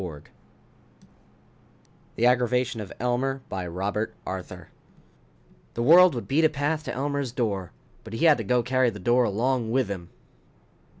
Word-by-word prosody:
net 75 Hz, -5 st, -9 dB, 1.9 s
The 115 Hz, -, +1 dB
Aggravation 125 Hz, -1 st, +1 dB
of 100 Hz, -, -8 dB
Elmer 130 Hz, +3 st, -1 dB
By 95 Hz, -2 st, -4 dB
ROBERT 100 Hz, +5 st, -3 dB
ARTHUR -, -, -7 dB, 1.0 s
_The 115 Hz, -, -1 dB
world 175 Hz, +3 st, +7 dB
would 120 Hz, -, -5 dB
beat 150 Hz, +4 st, +2 dB
a 160 Hz, -, +5 dB
path 150 Hz, +2 st, -2 dB
to -, -, -3 dB
Elmer's 140 Hz, -1 st, -2 dB
door 105 Hz, -8 st, -2 dB, 0.3 s
but 110 Hz, -, -10 dB
he 115 Hz, -, 0 dB
had 155 Hz, -5 st, +5 dB
to -, -, -2 dB
go 120 Hz, +4 st, +1 dB
carry 130 Hz, 0 st, +2 dB
the 105 Hz, -, -8 dB
door 120 Hz, +5 st, +2 dB
along 115 Hz, +3 st, 0 dB
with 125 Hz, -2 st, 0 dB
him! 90 Hz, -4 st, -6 dB
120 Hz, 155 wpm, -25 LUFS, 105-135 Hz, 1.9 s, world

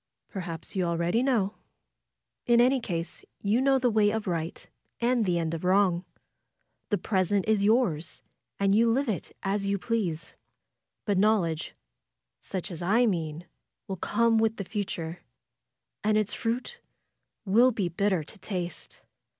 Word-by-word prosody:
Perhaps 175 Hz, -4 st, -6 dB
you 185 Hz, -, +1 dB
already 170 Hz, +5 st, +1 dB
know. 230 Hz, -7 st, +1 dB, 0.9 s
In 235 Hz, -1 st, +5 dB
any 255 Hz, +2 st, +4 dB
case 170 Hz, -6 st, -4 dB, 0.2 s
you 210 Hz, +5 st, +1 dB
know 270 Hz, 0 st, +4 dB
the 250 Hz, -2 st, +2 dB
way 215 Hz, -1 st, +4 dB
of 220 Hz, 0 st, -2 dB
right; 165 Hz, -2 st, -3 dB, 0.3 s
and 240 Hz, -1 st, +2 dB
the 175 Hz, -1 st, +2 dB
end 165 Hz, -1 st, -1 dB
of 165 Hz, -, -4 dB
wrong. 185 Hz, -1 st, +3 dB, 0.8 s
The 205 Hz, -, +2 dB
present 195 Hz, 0 st, 0 dB
is 215 Hz, -2 st, +3 dB
yours, 200 Hz, -8 st, +1 dB, 0.4 s
and 195 Hz, 0 st, +3 dB
you 230 Hz, +2 st, +4 dB
live 270 Hz, +4 st, +1 dB
it 210 Hz, -5 st, -4 dB
as 200 Hz, +1 st, -1 dB
you 200 Hz, 0 st, +1 dB
please. 180 Hz, -7 st, -2 dB, 0.7 s
But 200 Hz, -3 st, +1 dB
knowl 210 Hz, -2 st, +4 dB
edge, 160 Hz, -1 st, -4 dB, 0.6 s
such 190 Hz, +1 st, -5 dB
as 170 Hz, -, -6 dB
I 220 Hz, +8 st, +3 dB
mean, 165 Hz, -5 st, -2 dB, 0.4 s
will 195 Hz, -, -3 dB
come 230 Hz, +5 st, +2 dB
with 220 Hz, 0 st, +2 dB
the 200 Hz, -, -4 dB
future, 175 Hz, -5 st, -4 dB, 0.8 s
and 215 Hz, 0 st, +3 dB
its 215 Hz, -2 st, +1 dB
fruit 250 Hz, -, -3 dB, 0.7 s
will 230 Hz, +6 st, +5 dB
be 215 Hz, -7 st, -1 dB
bitter 185 Hz, -1 st, 0 dB
to 195 Hz, +7 st, -13 dB
taste. 180 Hz, -3 st, -5 dB
200 Hz, 150 wpm, -28 LUFS, 175-225 Hz, 0.9 s, In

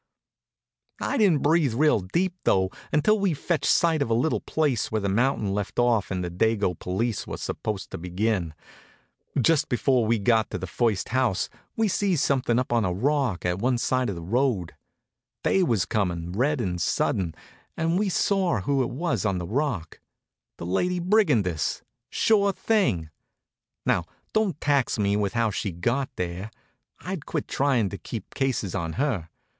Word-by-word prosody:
I -, -, -1 dB
didn't 190 Hz, -10 st, +3 dB
breathe 150 Hz, -5 st, +3 dB
real 150 Hz, -2 st, +4 dB
deep, 170 Hz, -, -1 dB
though, 95 Hz, 0 st, +2 dB, 0.2 s
until 205 Hz, +9 st, +3 dB
we'd 195 Hz, -5 st, +1 dB
fetched 170 Hz, +2 st, 0 dB
sight 165 Hz, -3 st, +3 dB
of 140 Hz, -, 0 dB
a 115 Hz, -, +3 dB
little 130 Hz, +7 st, +1 dB
place 145 Hz, -8 st, 0 dB
where 110 Hz, -, +1 dB
the 100 Hz, -, -1 dB
mountain 110 Hz, -1 st, +1 dB
left 100 Hz, -1 st, -3 dB
off 120 Hz, -4 st, +2 dB
and 90 Hz, -1 st, -2 dB
the 90 Hz, -, -4 dB
dago 105 Hz, +1 st, +1 dB
police 110 Hz, +5 st, -2 dB
were -, -, -5 dB
supposed 105 Hz, -3 st, -4 dB
to -, -, -5 dB
begin. 90 Hz, -1 st, -1 dB, 0.8 s
Just 150 Hz, +4 st, +3 dB
before 125 Hz, -2 st, +2 dB
we 115 Hz, +1 st, +3 dB
got 110 Hz, +1 st, +2 dB
to -, -, -3 dB
the -, -, -5 dB
first 115 Hz, -6 st, 0 dB
house 120 Hz, -6 st, +1 dB, 0.3 s
we 225 Hz, -1 st, +2 dB
sees 195 Hz, -3 st, +1 dB
something 130 Hz, -4 st, +1 dB
up 125 Hz, -1 st, 0 dB
on 115 Hz, -2 st, +3 dB
a 90 Hz, -, 0 dB
rock 125 Hz, -1 st, 0 dB
at 90 Hz, +1 st, 0 dB
one 125 Hz, +3 st, +1 dB
side 130 Hz, 0 st, 0 dB
of 100 Hz, -, -3 dB
the 85 Hz, -, -7 dB
road. 115 Hz, -2 st, 0 dB, 0.7 s
Day 195 Hz, -, +3 dB
was 115 Hz, -, +2 dB
comin', 90 Hz, -5 st, -1 dB
red 135 Hz, +9 st, +1 dB
and 90 Hz, -6 st, -2 dB
sudden, 85 Hz, -1 st, 0 dB, 0.4 s
and 165 Hz, +3 st, +1 dB
we 205 Hz, -1 st, +1 dB
saw 185 Hz, -, +1 dB
who 135 Hz, +7 st, +1 dB
it 125 Hz, -, 0 dB
was 130 Hz, -, -1 dB
on 100 Hz, -3 st, 0 dB
the 90 Hz, -, -4 dB
rock 115 Hz, -, -2 dB, 0.6 s
the -, -, -6 dB
lady 180 Hz, -, 0 dB
brigandess. 150 Hz, -, +1 dB, 0.3 s
Sure 200 Hz, -2 st, +3 dB
thing! 185 Hz, -, 0 dB, 0.7 s
Now -, -, +2 dB, 0.3 s
don't 210 Hz, -8 st, +1 dB
tax 140 Hz, -4 st, +1 dB
me 100 Hz, -1 st, +1 dB
with 105 Hz, -1 st, 0 dB
how 115 Hz, -2 st, +1 dB
she 100 Hz, 0 st, -2 dB
got 120 Hz, +11 st, -1 dB
there. 90 Hz, +3 st, -4 dB, 0.5 s
I'd 180 Hz, -4 st, -5 dB
quit -, -, -3 dB
trying 130 Hz, -7 st, +1 dB
to 100 Hz, -, -7 dB
keep 110 Hz, -5 st, -7 dB
cases 130 Hz, -9 st, -1 dB
on 85 Hz, -4 st, -2 dB
her. 115 Hz, -, -1 dB
120 Hz, 170 wpm, -25 LUFS, 95-150 Hz, 0.8 s, real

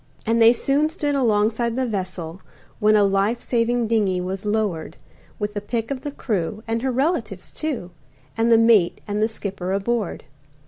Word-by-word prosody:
And 230 Hz, +1 st, +2 dB
they 225 Hz, 0 st, +8 dB
soon 275 Hz, +5 st, +1 dB
stood 300 Hz, -3 st, -2 dB
alongside 230 Hz, -2 st, +1 dB
the 260 Hz, 0 st, 0 dB
vessel, 185 Hz, -5 st, -4 dB, 0.4 s
When 215 Hz, +1 st, +4 dB
a 210 Hz, -, +5 dB
life 200 Hz, +4 st, +1 dB
saving 240 Hz, 0 st, 0 dB
dingey 210 Hz, -5 st, +1 dB
was 190 Hz, +3 st, -4 dB
lowered 205 Hz, -7 st, -1 dB, 0.4 s
With 210 Hz, -1 st, -3 dB
the 205 Hz, -, -3 dB
pick 225 Hz, +3 st, -3 dB
of 265 Hz, -2 st, -3 dB
the 290 Hz, -, -4 dB
crew, 215 Hz, -6 st, -3 dB
and 225 Hz, 0 st, -1 dB
her 260 Hz, +1 st, 0 dB
relatives, 255 Hz, -, -1 dB
too, 255 Hz, -, -4 dB, 0.4 s
And 230 Hz, +1 st, +2 dB
the 230 Hz, -, +7 dB
mate 225 Hz, -6 st, +4 dB
and 205 Hz, 0 st, -1 dB
the 220 Hz, -, +3 dB
skipper 195 Hz, -4 st, -5 dB
aboard. 200 Hz, +1 st, -1 dB
220 Hz, 175 wpm, -22 LUFS, 200-240 Hz, 0.4 s, they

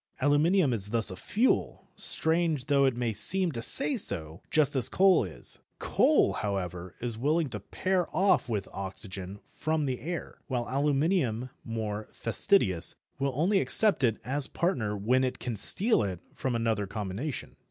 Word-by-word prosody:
Aluminium 145 Hz, +2 st, +3 dB
is 100 Hz, -3 st, +1 dB
thus 115 Hz, -2 st, 0 dB
a -, -, -6 dB
fuel, 220 Hz, -, 0 dB
strange 160 Hz, -4 st, 0 dB
though 140 Hz, -2 st, +3 dB
it 130 Hz, -3 st, +1 dB
may 120 Hz, -2 st, -1 dB
seem 175 Hz, -, +1 dB
to 120 Hz, -5 st, -5 dB
say 275 Hz, -, +2 dB
so, 80 Hz, -, -3 dB
just 145 Hz, -2 st, +2 dB
as 130 Hz, -, +4 dB
coal 190 Hz, -5 st, +4 dB
is. 90 Hz, -7 st, -3 dB, 0.2 s
Coal, -, -, +3 dB
however, 90 Hz, -3 st, -4 dB
is 115 Hz, -2 st, -4 dB
willing 150 Hz, +3 st, +1 dB
to 105 Hz, -, -5 dB
pair 185 Hz, -, -1 dB
off 185 Hz, -10 st, +2 dB
with 105 Hz, -4 st, -2 dB
oxygen 95 Hz, 0 st, -6 dB
from 155 Hz, -1 st, -1 dB
the 130 Hz, -2 st, -2 dB
air, 175 Hz, +2 st, -6 dB
while 125 Hz, -3 st, -2 dB
aluminium, 140 Hz, -, 0 dB
more 110 Hz, -2 st, -4 dB
fastidious, 115 Hz, -, +2 dB, 0.2 s
will 140 Hz, -1 st, 0 dB
only 185 Hz, +8 st, +2 dB
accept 210 Hz, -10 st, +4 dB
it 115 Hz, -3 st, +2 dB
as 135 Hz, +2 st, -1 dB
partner 115 Hz, -, -1 dB
when 125 Hz, +6 st, +2 dB
it 130 Hz, -, -1 dB
can 120 Hz, -3 st, -4 dB
steal 205 Hz, -, +3 dB
it 95 Hz, -4 st, -3 dB
from 130 Hz, -3 st, -2 dB
another 110 Hz, -3 st, 0 dB
combination. 105 Hz, +8 st, -5 dB
125 Hz, 160 wpm, -28 LUFS, 105-160 Hz, 0.2 s, as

